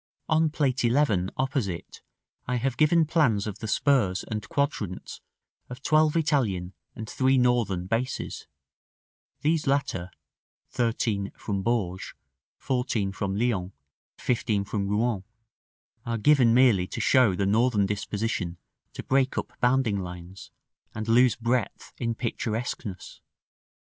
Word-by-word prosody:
On 160 0 +3
Plate 140 -4 0
XI., 120 -7 +2
opposite, 130 - -3 0.5
I 125 - 0
have 125 +1 -1
given 155 +4 +4
plans 145 -11 +2
of 105 -2 -6
the 110 - -5
spurs 110 -6 +2
and 105 -2 -5
quadrants 140 - -3 0.5
of 125 +2 -9
twelve 155 0 +3
Italian 110 - 0 0.2
and 110 - -7
three 130 +2 +2
Northern 120 -8 +1
bases; 115 +6 -3 0.9
these 155 0 +1
latter 135 -10 0 0.6
(13), 115 -5 -1
from 100 -2 -3
Bourges, 95 -4 -2 0.4
(14) 125 -6 -1
from 95 0 -3
Lyons, 100 -5 -1 0.4
(15) 110 -4 0
from 100 0 -3
Rouen, 105 -1 0 0.8
are 115 0 -2
given 125 0 +4
merely 115 -7 +4
to - - -6
show 115 -3 +4
the 100 - 0
Northern 110 0 +3
disposition 100 -3 -3 0.4
to - - -7
break 135 0 +1
up - - -3
bounding 125 -5 +2
lines, 90 +1 -8 0.5
and 110 0 -4
lose 120 0 +5
breadth 120 -1 -2
in 115 -2 -1
picturesqueness. 110 -4 -4
115 Hz, 125 wpm, -26 LUFS, 100-130 Hz, 0.9 s, lose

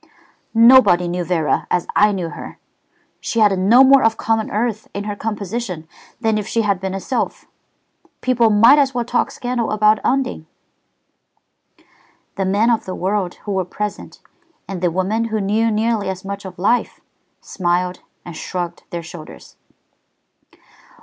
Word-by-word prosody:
"Nobody 225 -7 +6
knew 175 +1 -2
Vera 165 -3 0
as 180 - 0
I 210 0 +5
knew 180 -4 -3
her. - - -9 0.6
She 230 - -2
had 205 -3 +4
no 230 +8 +6
more 270 0 +6
of 225 0 +2
common 225 -1 0
earth 215 0 -2
in 200 - -3
her 205 0 -4
composition 205 -5 -4 0.3
than 220 -2 +1
if 210 - -6
she 230 - 0
had 200 -3 0
been 190 0 -3
a - - -3
sylph. 245 +7 -3 0.8
People 245 -3 +2
might 230 +7 +6
as 270 -2 +1
well 240 -1 -1
talk 240 +1 0
scandal 245 -2 -3
about 215 0 +3
Undine." 255 -12 -1 1.9
The 195 - -1
men 205 +5 +2
of 230 - 0
the 185 - -5
world 190 -1 -2
who 205 - -3
were 190 -1 0
present, 210 +3 -6 0.5
and 190 -2 -6
the 180 - +2
women 190 +6 -1
who 220 -1 -2
knew 215 +3 +1
nearly 215 -2 0
as 190 0 -6
much 200 0 -6
of 185 -1 -9
life, 210 +7 0 0.4
smiled 180 0 -2 0.3
and 175 - -8
shrugged 175 0 -5
their 170 -1 -5
shoulders. 160 -1 -12
205 Hz, 155 wpm, -19 LUFS, 185-230 Hz, 1.9 s, Nobody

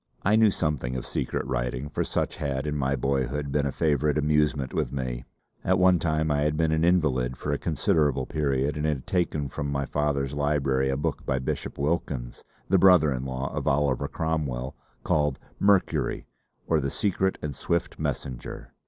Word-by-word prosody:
I 105 +2 +4
knew 110 -1 +6
something 75 -9 -1
of 65 - -4
secret - - -2
writing, 65 +1 -2
for 70 - -2
such - - -2
had 70 -1 -2
in 75 0 -2
my 70 -1 +1
boyhood 70 +2 -1
been 70 0 +1
a - - -1
favourite 75 -1 +1
amusement 75 -2 +1
with - - -1
me. 65 -3 -4 0.4
At 95 +1 +3
one 95 -1 +5
time 80 -1 0
I 75 0 +2
had 75 +1 +1
been 80 -1 +2
an 80 0 +2
invalid 65 -8 +2
for 70 - -3
a 70 - -1
considerable 75 -3 +1
period 70 -1 0
and 75 +1 0
had 70 -4 -1
taken 80 -6 0
from 70 +2 -4
my 70 0 -1
father's 70 -1 -1
library 70 -2 +1
a 65 - 0
book 75 +1 -2
by 65 - 0
Bishop 65 - -3
Wilkins, 70 -5 -2 0.2
the 95 0 +4
brother 85 -6 +6
in 65 +1 -4
law 65 +1 -3
of - - -3
Oliver 70 -2 +2
Cromwell, 70 -6 -2 0.3
called 75 -3 +1 0.2
"Mercury: 100 -2 +2 0.4
or 80 - +2
the 70 -1 -1
Secret 95 +3 0
and 75 -2 -2
Swift 85 +5 -2
Messenger." 60 -2 -5
75 Hz, 180 wpm, -26 LUFS, 65-80 Hz, 0.4 s, knew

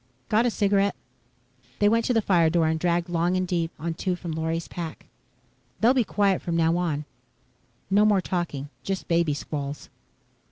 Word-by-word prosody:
Got 225 +3 +3
a - - +3
cigarette?" 200 -2 +1 0.8
They 205 - +3
went 230 +2 +3
to 250 - +1
the 225 - +3
fire 170 -5 +4
door 165 -1 +2
and 160 0 0
dragged 175 0 +1
long 175 +1 +1
and 185 0 -1
deep 170 -2 0
on 165 +1 -3
two 180 +2 -2
from 175 -1 -6
Lorry's 160 +1 -2
pack. 165 -3 -7 0.7
"They'll 235 +3 +5
be 255 -3 +3
quiet 200 -3 +1
from 170 - -2
now 165 0 +3
on. 155 -4 -1 0.9
No 205 +2 +5
more 210 -2 +4
talking 170 -7 -3
just 195 -1 -4
baby 165 -3 +2
squalls." 145 -1 -5
175 Hz, 175 wpm, -25 LUFS, 165-200 Hz, 0.9 s, They'll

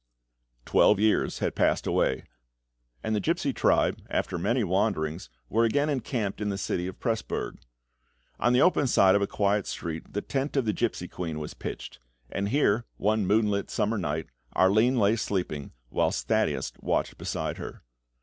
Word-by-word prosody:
Twelve 105 - +4
years 110 0 +2
had - - -1
passed - - +1
away, 65 - +1 0.8
and 110 - 0
the - - +1
gipsy 95 - 0
tribe, - - +2
after 85 - -1
many 120 +7 +1
wanderings, 90 - 0 0.2
were 115 - +2
again 145 +6 +2
encamped 115 -6 -2
in 105 - 0
the 100 - -2
city 90 -2 -2
of 95 - -8
Presburg. 115 -2 -2 0.8
On 120 - +3
the 125 +2 +5
open 165 -6 +3
side 95 -6 +5
of 100 - +3
a 100 - +1
quiet 100 -1 +1
street 80 -2 -5
the 105 - -2
tent 140 +1 -2
of 135 - +2
the 105 - +1
gipsy 110 -6 -1
queen 85 -4 -5
was 75 -1 -5
pitched; - - -7 0.3
and 100 +1 -1
here, 120 -4 +2
one 105 -1 +1
moonlit 105 -1 +2
summer 105 +1 0
night, 80 -2 -2 0.3
Arline 110 +7 +4
lay 105 0 +4
sleeping, 90 -10 -3 0.2
whilst - - 0
Thaddeus - - +1
watched - - -1
beside - - -3
her. - - -8
105 Hz, 165 wpm, -27 LUFS, 95-115 Hz, 0.8 s, the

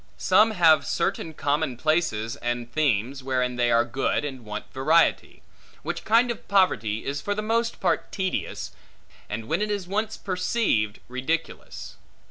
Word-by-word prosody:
Some 215 +2 +4
have 165 -8 +5
certain 160 -1 -1
common 145 -3 -1
places, 130 -7 0
and 120 -1 -3
themes, 135 -3 0
wherein 125 -1 0
they 120 -1 +1
are 115 0 +4
good 135 +3 -1
and 130 -4 -6
want 105 -1 -6
variety; 155 +5 +2 0.4
which - - -4
kind 235 +3 +4
of 235 - -8
poverty 115 - +2
is 140 +1 -3
for 205 - -2
the 210 - -3
most 230 +2 0
part - - 0
tedious, 190 -2 -3 0.6
and 110 +1 -5
when 165 - 0
it 210 - 0
is 200 -3 -2
once 215 +3 -2
perceived, 180 - 0
ridiculous. 130 +7 -4
150 Hz, 150 wpm, -25 LUFS, 120-195 Hz, 0.6 s, have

